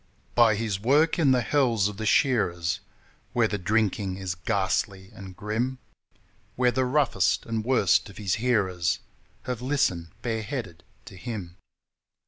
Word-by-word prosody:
By 115 Hz, -3 st, +5 dB
his 105 Hz, -3 st, -2 dB
work 150 Hz, -, +3 dB
in 150 Hz, -5 st, +4 dB
the 130 Hz, -1 st, +4 dB
hells 120 Hz, -7 st, +2 dB
of 105 Hz, -1 st, -6 dB
the 110 Hz, 0 st, -3 dB
shearers, 90 Hz, -, +2 dB, 0.5 s
Where 120 Hz, -2 st, +3 dB
the 105 Hz, -1 st, -3 dB
drinking 100 Hz, -1 st, 0 dB
is 95 Hz, -2 st, -3 dB
ghastly 95 Hz, 0 st, -1 dB
and 95 Hz, -3 st, -10 dB
grim, 115 Hz, +5 st, -2 dB, 0.8 s
Where 125 Hz, 0 st, +3 dB
the 130 Hz, +1 st, +1 dB
roughest 140 Hz, +1 st, +1 dB
and 115 Hz, -1 st, -2 dB
worst 110 Hz, -5 st, +3 dB
of 100 Hz, -, -13 dB
his 100 Hz, -4 st, -1 dB
hearers 95 Hz, -8 st, +1 dB, 0.5 s
Have 125 Hz, -2 st, -4 dB
listened 125 Hz, -, 0 dB, 0.2 s
bareheaded 110 Hz, -, -4 dB, 0.2 s
to -, -, -11 dB
him. 95 Hz, -4 st, -6 dB
110 Hz, 140 wpm, -26 LUFS, 95-125 Hz, 0.8 s, By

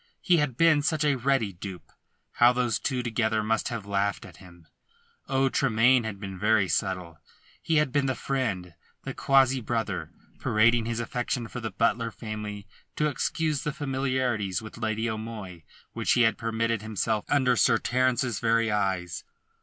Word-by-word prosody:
He 175 Hz, -, +3 dB
had 145 Hz, -6 st, 0 dB
been 165 Hz, -2 st, +5 dB
such 155 Hz, 0 st, 0 dB
a 145 Hz, -, +3 dB
ready 125 Hz, -5 st, 0 dB
dupe. 90 Hz, 0 st, -9 dB, 0.4 s
How 120 Hz, +1 st, +5 dB
those 120 Hz, -3 st, 0 dB
two 130 Hz, -3 st, -2 dB
together 110 Hz, -2 st, 0 dB
must 110 Hz, +1 st, 0 dB
have 115 Hz, -4 st, -5 dB
laughed 100 Hz, 0 st, -1 dB
at -, -, -13 dB
him! 85 Hz, -3 st, -16 dB, 0.6 s
Oh, 135 Hz, 0 st, +2 dB
Tremayne 125 Hz, -1 st, +3 dB
had 100 Hz, -3 st, -5 dB
been 95 Hz, -2 st, -7 dB
very 105 Hz, -1 st, +3 dB
subtle! 90 Hz, -2 st, -2 dB, 0.4 s
He 165 Hz, -, 0 dB
had 150 Hz, -3 st, +3 dB
been 140 Hz, 0 st, +1 dB
the 130 Hz, -, 0 dB
friend, 100 Hz, -11 st, -2 dB, 0.3 s
the -, -, -5 dB
quasi 135 Hz, -1 st, +3 dB
brother, 115 Hz, -1 st, -2 dB, 0.3 s
parading 115 Hz, +2 st, +3 dB
his 115 Hz, 0 st, -2 dB
affection 120 Hz, 0 st, -2 dB
for 125 Hz, -, -7 dB
the 110 Hz, -1 st, -4 dB
Butler 115 Hz, 0 st, 0 dB
family 105 Hz, -2 st, -6 dB, 0.3 s
to 150 Hz, -, +1 dB
excuse 150 Hz, 0 st, -1 dB
the 150 Hz, -, -2 dB
familiarities 130 Hz, -8 st, -1 dB
with 110 Hz, +1 st, -10 dB
Lady 110 Hz, 0 st, -1 dB
O'Moy 110 Hz, -6 st, -6 dB, 0.3 s
which -, -, +1 dB
he 125 Hz, -, +4 dB
had 115 Hz, -, +3 dB
permitted 115 Hz, -1 st, -1 dB
himself 110 Hz, 0 st, -1 dB
under 130 Hz, -3 st, +3 dB
Sir 115 Hz, -, +4 dB
Terence's 125 Hz, -1 st, 0 dB
very 115 Hz, -1 st, +2 dB
eyes. 95 Hz, -4 st, -1 dB
115 Hz, 165 wpm, -27 LUFS, 105-130 Hz, 0.6 s, been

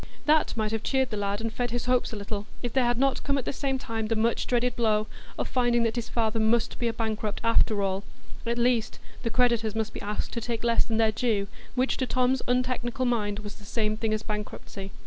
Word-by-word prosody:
That 305 Hz, -4 st, +3 dB
might 215 Hz, -1 st, 0 dB
have 225 Hz, -1 st, -1 dB
cheered 265 Hz, 0 st, +1 dB
the -, -, -1 dB
lad 200 Hz, +1 st, -1 dB
and 225 Hz, -1 st, -2 dB
fed 245 Hz, +1 st, -1 dB
his 240 Hz, +1 st, -2 dB
hopes 250 Hz, 0 st, +2 dB
a -, -, -4 dB
little, 205 Hz, 0 st, -4 dB, 0.2 s
if 240 Hz, -, -2 dB
there 260 Hz, -2 st, +3 dB
had 240 Hz, 0 st, +2 dB
not 270 Hz, +1 st, +2 dB
come 280 Hz, 0 st, +1 dB
at 265 Hz, -, -2 dB
the -, -, -1 dB
same 270 Hz, 0 st, -1 dB
time 225 Hz, -3 st, -3 dB
the 225 Hz, -, +1 dB
much 225 Hz, +2 st, +1 dB
dreaded 245 Hz, 0 st, +1 dB
blow 215 Hz, -2 st, +2 dB, 0.3 s
of -, -, -1 dB
finding 240 Hz, -2 st, +2 dB
that 230 Hz, 0 st, 0 dB
his 235 Hz, -2 st, -3 dB
father 225 Hz, -1 st, 0 dB
must 220 Hz, +1 st, +2 dB
be 240 Hz, -, +1 dB
a -, -, +2 dB
bankrupt, 220 Hz, -2 st, -2 dB
after 225 Hz, -2 st, +3 dB
all; 195 Hz, 0 st, -1 dB, 0.4 s
at 235 Hz, 0 st, 0 dB
least, 240 Hz, -2 st, +2 dB, 0.2 s
the 230 Hz, -, -1 dB
creditors 230 Hz, -2 st, +2 dB
must 220 Hz, -1 st, -1 dB
be -, -, -6 dB
asked 210 Hz, +1 st, -3 dB
to 235 Hz, -, -2 dB
take 230 Hz, 0 st, -3 dB
less 235 Hz, -1 st, +3 dB
than 225 Hz, -2 st, -1 dB
their 220 Hz, -1 st, +4 dB
due, 215 Hz, -3 st, +1 dB, 0.3 s
which 255 Hz, +1 st, +1 dB
to 260 Hz, -, 0 dB
Tom's 255 Hz, +1 st, +2 dB
untechnical 250 Hz, +1 st, 0 dB
mind 210 Hz, -4 st, +1 dB
was 205 Hz, -1 st, -8 dB
the 210 Hz, -, -15 dB
same 215 Hz, 0 st, 0 dB
thing 220 Hz, 0 st, -1 dB
as 215 Hz, 0 st, -1 dB
bankruptcy. 210 Hz, -2 st, -5 dB
230 Hz, 240 wpm, -27 LUFS, 215-245 Hz, 0.4 s, their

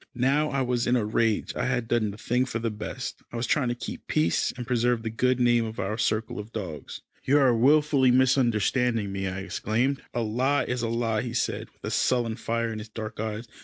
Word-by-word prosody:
Now 140 Hz, +5 st, +2 dB
I 135 Hz, -1 st, 0 dB
was 125 Hz, -1 st, 0 dB
in 120 Hz, -, +3 dB
a 115 Hz, -4 st, +1 dB
rage. 110 Hz, 0 st, 0 dB
I 125 Hz, -, -1 dB
had 125 Hz, -2 st, -1 dB
done 115 Hz, -3 st, +1 dB
the 100 Hz, -, -8 dB
thing 125 Hz, +3 st, 0 dB
for 125 Hz, -, -3 dB
the 115 Hz, 0 st, -2 dB
best. 105 Hz, 0 st, -6 dB
I 120 Hz, -, -5 dB
was 115 Hz, -, -1 dB
trying 145 Hz, -2 st, +1 dB
to 120 Hz, -, -1 dB
keep -, -, -7 dB
peace, 80 Hz, +2 st, +1 dB
and 120 Hz, -, -5 dB
preserve 120 Hz, -1 st, +1 dB
the 110 Hz, -, -3 dB
good 125 Hz, +2 st, +1 dB
name 120 Hz, -1 st, +4 dB
of 110 Hz, 0 st, -6 dB
our 95 Hz, +3 st, -1 dB
circle 110 Hz, -1 st, -1 dB
of 105 Hz, +2 st, -8 dB
dogs. 90 Hz, -10 st, -6 dB, 0.2 s
"You 140 Hz, +3 st, +4 dB
are 130 Hz, -4 st, +4 dB
wilfully 140 Hz, +2 st, +4 dB
misunderstanding 125 Hz, -3 st, +2 dB
me," 95 Hz, 0 st, -2 dB
I 95 Hz, 0 st, -4 dB
exclaimed. 110 Hz, +8 st, -1 dB
"A 120 Hz, -, +1 dB
lie 130 Hz, +5 st, +1 dB
is 125 Hz, -1 st, -2 dB
a 115 Hz, -, -1 dB
lie," 115 Hz, -2 st, 0 dB
he 120 Hz, -1 st, -5 dB
said, -, -, -1 dB
with -, -, -35 dB
a -, -, +2 dB
sullen 120 Hz, -3 st, +1 dB
fire 115 Hz, 0 st, -2 dB
in 110 Hz, -, -5 dB
his 105 Hz, +1 st, -9 dB
dark 110 Hz, -1 st, -7 dB
eyes. 110 Hz, +1 st, -4 dB
120 Hz, 230 wpm, -26 LUFS, 110-125 Hz, 0.2 s, name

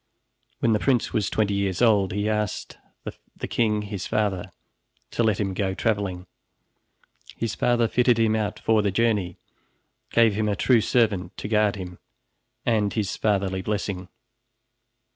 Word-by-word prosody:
When 115 Hz, -, +3 dB
the 105 Hz, -, +2 dB
prince 125 Hz, -1 st, +1 dB
was 105 Hz, -4 st, 0 dB
twenty 105 Hz, -2 st, 0 dB
years 100 Hz, -2 st, -1 dB
old, 105 Hz, -5 st, +3 dB
he 105 Hz, +2 st, -1 dB
asked 105 Hz, -2 st, -2 dB, 0.6 s
the -, -, -5 dB
king, 105 Hz, -3 st, +1 dB
his 100 Hz, -2 st, -5 dB
father, 105 Hz, -4 st, -1 dB, 0.6 s
to -, -, -1 dB
let 110 Hz, -3 st, +2 dB
him 100 Hz, -3 st, -1 dB
go 95 Hz, 0 st, -1 dB
traveling. 100 Hz, -5 st, -1 dB, 1.1 s
His 115 Hz, -4 st, -2 dB
father 120 Hz, +7 st, +2 dB
fitted 125 Hz, 0 st, +3 dB
him 110 Hz, -1 st, +2 dB
out 105 Hz, -2 st, -2 dB
for 110 Hz, -1 st, +2 dB
the 100 Hz, -, +1 dB
journey, 105 Hz, -3 st, 0 dB, 0.7 s
gave 115 Hz, -2 st, +4 dB
him 105 Hz, +1 st, 0 dB
a 100 Hz, -, 0 dB
true 120 Hz, +4 st, +3 dB
servant 100 Hz, -7 st, 0 dB
to -, -, -5 dB
guard 105 Hz, -1 st, +2 dB
him, 90 Hz, -2 st, -8 dB, 0.7 s
and 105 Hz, -3 st, +2 dB
his 105 Hz, -2 st, -2 dB
fatherly 95 Hz, -3 st, 0 dB
blessing. 100 Hz, -2 st, -3 dB
105 Hz, 150 wpm, -24 LUFS, 95-110 Hz, 1.1 s, gave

